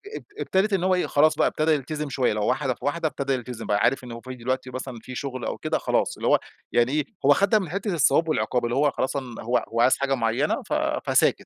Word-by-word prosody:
اب - - -7 0.2
ابتدت 195 +2 +1
إن 185 -2 +1
هو 185 0 +3
إيه، 180 - 0
خلاص 155 +2 +4
بقى - - +3
ابتدى 155 +1 +1
يلتزم 150 0 -2
شوية، 130 -2 +1
اللي 105 - -1
هو - - 0
واحدة 130 +1 0
في - - -11
واحدة 160 +3 0
ابتدى 140 -2 -2
يلتزم، 120 -3 -5
بقى 100 - +1
عارف 130 +4 +2
إنه 120 -1 -7
هو 115 - -9
في 130 +1 -8
دلوقتي 130 +1 -3
مثلًا 130 -1 -6
في 125 +2 -9
شغل 130 -2 -4
أو - - -3
كده - - -1
خلاص، - - 0
اللي - - -2
هو - - +5 0.3
يعني 120 +2 +2
إيه، 150 0 0 0.2
هو 145 - +7
أخدها 200 +7 +4
من 185 - -5
حتة 195 +2 -2
الثواب 165 +1 +3
والعقاب، 125 -5 0
اللي 120 - -1
هو 145 +1 +3
خلاص 130 - -2
أن 125 -4 -6
هو 120 +2 0
هو 115 +1 +1
عايز 130 - +4
حاجة 140 0 0
معينة 120 +4 0
ف - - -5 0.4
فساكت. - - +3
135 Hz, 260 wpm, -25 LUFS, 125-155 Hz, 0.4 s, هو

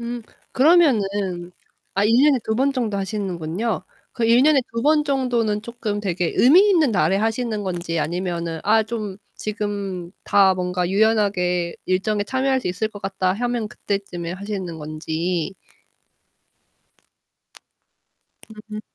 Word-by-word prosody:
음. 235 0 -5 0.3
그러면은 205 - +2 0.4
아 200 - +2
1 220 +2 +3
년에 290 -3 +5
그래도 220 - -2
2 - - +1
번 270 +4 +2
정도 235 -6 -1
하시는군요. 195 0 -3 0.3
그 235 - -1
1 235 +2 +5
년에 295 -1 +5
그래도 230 - -6
2 - - -1
번 300 +1 +3
정도는 245 -7 0
쪼끔 225 -3 -4
되게 180 -4 -1
의미 350 +11 +6
있는 325 -8 +4
날에 180 0 +2
하시는 225 0 -1
건지, 175 -3 -3
아니면은 170 0 -2
'아, 220 +2 +4
좀 215 -3 -5 0.2
지금 200 -4 -4
다 195 -2 +4
뭔가 180 -1 -1
유연하게 195 -4 +1
일정에 205 +3 0
참여할 265 +3 0
수 - - -2
있을 200 +5 -1
것 205 -2 -12
같다.' 190 -1 0
하면 240 0 -2
그때쯤에 190 -5 -4
하시는 190 -3 -5
건지. 160 +3 -3 3.0
음. 215 0 -8
205 Hz, 265 characters per minute, -22 LUFS, 180-235 Hz, 3.0 s, 의미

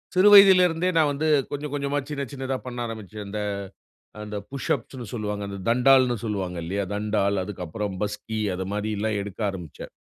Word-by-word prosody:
சிறு 190 +3 +6
வயதிலிருந்தே, 185 -3 +7
நான் 155 -2 +4
வந்து 150 +3 -1 0.2
கொஞ்சம் 145 0 -4
கொஞ்சமா, 140 0 -1
சின்ன 140 -2 -3
சின்னதா, 135 -1 -3
பண்ண 120 -1 -6
ஆரம்பிச்சேன். 105 -2 -7
அந்த 105 +1 -4 0.8
அந்த 105 0 -6
புஷ் 140 -1 -5
அப்ஸ்னு 125 -1 -7
சொல்லுவாங்க. 105 -2 -3
அந்த 100 0 -6
தண்டால்னு 125 0 +5
சொல்லுவாங்க 95 -5 -3
இல்லயா? 100 +3 -2
தண்டால் 100 -2 0
அதுக்கப்புறம், 100 +1 -5
பஸ்கி 105 +1 -3
அது 95 +1 -3
மாரில்லாம் 105 0 -1
எடுக்க 100 0 -8
ஆரம்பிச்சேன். 90 -6 -9
110 Hz, 155 wpm, -25 LUFS, 100-140 Hz, 0.8 s, வயதிலிருந்தே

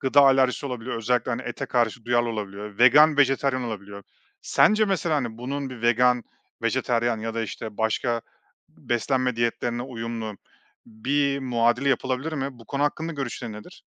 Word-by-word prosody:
gıda 135 +1 +4
alerjisi 135 0 +4
olabiliyor 125 -2 -4
özellikle, 120 +2 0
hani, 125 +1 -2
ete 135 - -5
karşı 120 -2 0
duyarlı 120 0 +2
olabiliyor, 105 -2 -6
vegan, 145 +5 +7
vejetaryen 135 -1 +2
olabiliyor. 100 -3 -6 0.4
Sence 215 0 +4
mesela, 175 -5 0
hani, 120 -5 -3
bunun 135 +2 -4
bir 120 -3 -9
vegan, 120 +1 +3 0.4
vejetaryen 120 -1 +1
ya 115 +1 -4
da, 115 - -1
işte, 110 0 -7
başka 115 +1 0 0.5
b - - -23
beslenme 125 +1 0
diyetlerine 120 +1 -1
uyumlu 115 -4 -5 0.5
bir 140 +5 0
muadili 125 0 +1
yapılabilir 135 +3 -1
mi? 135 -4 -4
Bu 115 - -15
konu 140 +4 -2
hakkında 160 +3 -1
görüşlerin 125 -4 -5
nedir? 105 0 -12
125 Hz, 155 wpm, -25 LUFS, 115-135 Hz, 0.5 s, vegan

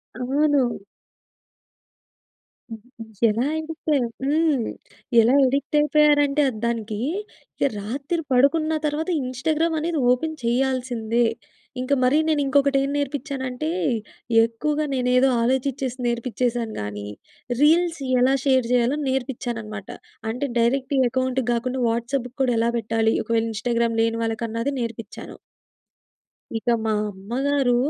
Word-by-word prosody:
అవును. 270 +2 +2 2.0
హుహు. 225 +1 -10 0.3
ఎలా 220 +3 0
అడిక్ట్ 315 0 -4 0.3
హ్మ్. 295 -4 +2 0.6
ఎలా 235 +3 +3
అడిక్ట్ 280 +3 0
అయిపోయారంటే 295 -1 +3
అద్ 225 - -7
దానికి 225 -2 -2 0.6
ఇక 280 - +1
రాత్రి 275 +10 -3
పడుకున్న 295 +5 +3
తర్వాత 300 +3 -1
ఇంస్టాగ్రామ్ 310 +6 0
అనేది 325 -1 -1
ఓపెన్ 315 +5 0
చేయాల్సిందే. 240 -2 0 0.6
ఇంక 255 +2 0
మరి 255 +4 +4
నేను 310 -2 +2
ఇంకొకటి 280 0 +3
ఏం 275 - -2
నేర్పించానంటే, 280 -1 -3 0.7
ఎక్కువగా 295 +7 -1
నేనేదో 250 +1 +3
ఆలోచిచ్చేసి 260 +1 -1
నేర్పించేసాను 235 -1 -1
గానీ, 105 0 -5 0.5
రీల్స్ 330 +1 +3
యెలా 255 +2 +4
షేర్ 260 -3 +3
జేయాలో 250 +3 +2
నేర్పించానన్నమాట. 240 -5 -4 0.4
అంటే, 250 +5 -2
డైరెక్ట్ 260 +4 +1
అకౌంట్‌కి 260 0 -1
గాకుండా 250 +2 -1
వాట్సాప్‌‌కి 240 +2 -2
కూడా 255 -2 +2
ఎలా 235 +1 +2
బెట్టాలి. 225 0 +1
ఒకవేళ 230 0 +1
ఇంస్టాగ్రామ్ 235 +1 0
లేని 230 0 0
వాళ్ళకన్నది 230 +4 -2
నేర్పించాను. 230 -2 -7 1.2
ఇక 225 - -10 0.2
మా 220 - 0 0.2
అమ్మగారు 245 +6 0
255 Hz, 110 wpm, -23 LUFS, 230-285 Hz, 2.0 s, మరి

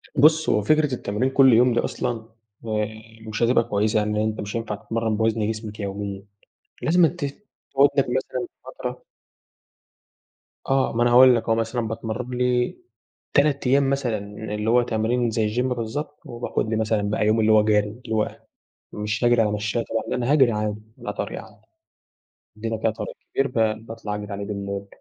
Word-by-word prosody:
بُصّ، 155 +3 +5
هو 105 - +3
فكرة 150 +4 +2
التمرين 115 +2 -1
كلّ 135 -1 +6
يوم 120 +2 +5
دي 120 - +2
أصلًا 115 -2 -3 0.4
آآ 105 -1 0 0.4
مش 110 +2 -2
هتبقى 120 0 +4
كويسة، 105 +1 0
يعني 105 0 0
أنت 110 0 -2
مش 105 +2 -6
هينفع 115 -2 -2
تتمرّن 115 0 -2
بوَزن 110 -1 +1
جسمك 110 -1 -7
يوميًا. 100 -1 -4 0.6
لازمًا 170 +1 +4
ت 160 -1 -4 0.5
تقعُد 140 +1 +6
لك - - +3
مثلًا 125 -1 -2 0.2
فترة. - - -6 1.6
آه، 135 -2 +2
ما 120 - +3
أنا 120 - +3
هاقول 125 +1 +8
لك 115 - 0
أهو، 115 - +4
مثلًا 115 0 -1
باتمرّن 115 +3 -4
لي 125 -1 +1 0.6
3 140 -2 +2
أيام 135 +1 +4
مثلًا، 135 -5 0 0.4
اللي 105 +1 -1
هو 120 +1 +5
تمرين 120 +1 0
زي 110 0 -1
الgym 125 - +2
بالضبط 130 +5 -3
وباخد 120 -2 -3
لي 110 - 0
مثلًا 110 -1 +1
بقى 105 0 0
يوم 110 +1 +3
اللي 110 0 +3
هو 110 -1 +6
جَري، 105 -1 +2 0.2
اللي 110 - -2
هو 110 - -1 0.6
مش 105 +2 -3
هاجرِي 120 -1 +5
على 105 -2 +1
مشايّة 105 +2 -1
طبعًا، 115 - -1
لأ - - -1
أنا 125 +2 0
هاجري 135 -5 +5
عادي 105 -1 -2 0.2
على - - -5
طريق - - -4
عادي، - - -17 1.0
عندنا 115 +1 -3
كده 110 +1 +1
طريق 110 - -6 0.2
كبير 135 0 +1
ب 110 -2 0
باطلَع 110 -2 -5
أجري 105 0 -6
عليه 100 0 -4
بالليل 100 -1 -4
115 Hz, 180 wpm, -23 LUFS, 105-125 Hz, 1.6 s, هاقول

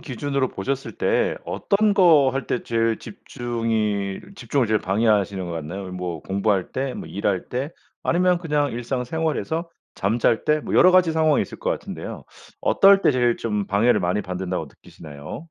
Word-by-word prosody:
기준으로 140 -1 -1
보셨을 135 -4 -4
때 - - +1
어떤 205 +1 +1
거 160 -8 +5
할 135 -2 -3
때 125 - -2
제일 115 -1 0
집중이 110 -4 -3 0.2
집중을 140 - 0
제일 110 -1 +2
방해하시는 100 -1 +1
것 85 - -5
같나요? 90 +4 -6
뭐 90 -2 -4
공부할 100 -1 0
때? 130 0 -2
뭐 - - -7
일할 100 -2 -2
때? 135 +6 -3 0.3
아니면 180 +1 +2
그냥 150 -4 0
일상생활에서? 155 +7 -2 0.3
잠잘 115 +3 +1
때? 150 0 +3
뭐 - - -6
여러 185 - +7
가지 180 -3 +4
상황이 155 -2 +3
있을 - - -6
것 - - -2
같은데요. - - -5 0.4
어떨 195 0 +5
때 - - +4
제일 120 -2 +2
좀 105 -3 -2
방해를 115 +5 +3
많이 90 +4 0
받는다고 90 -2 -4
느끼시나요? 75 +1 -11
120 Hz, 350 characters per minute, -23 LUFS, 100-150 Hz, 0.4 s, 여러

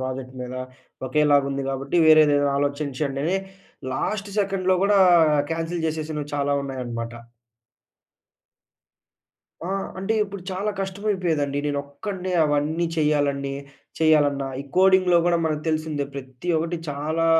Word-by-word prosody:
Project 130 0 -5
మీద 125 0 -6 0.5
ఒకేలాగుంది 140 -1 +2
గాబట్టి, 135 +4 -2
వేరేదేదైనా 145 -2 +5
ఆలోచించండని 145 +3 -1 0.6
last 205 +8 -2
సెకండ్‌లో 190 -2 +1
గూడా 200 0 +4 0.5
కాన్సెల్ 165 +1 -3
జేసేసినవి 155 -2 -3
చాలా 145 0 0
ఉన్నాయనమాట. 120 -4 -5 2.5
ఆ! - - -4 0.3
అంటే, 195 +4 -1
ఇప్పుడు 200 -2 -8
చాలా 195 +3 -2
కష్టమైపోయేదండి, 185 -8 -1
నేనొక్కడినే 145 +7 -4
అవన్నీ 150 +3 0
చెయ్యాలన్నీ 145 -3 +1 0.5
చెయ్యాలన్నా. 145 -3 +3
ఈ - - -5
కోడింగ్‌లో 185 -2 +5
గూడా 175 -1 +3
మనకు 155 -1 -1
తెలిసిందే, 155 -2 -1
ప్రతి 130 +4 -8
ఒకటి 165 +2 -2
చాలా 155 +3 -1
150 Hz, 105 wpm, -24 LUFS, 140-175 Hz, 2.5 s, వేరేదేదైనా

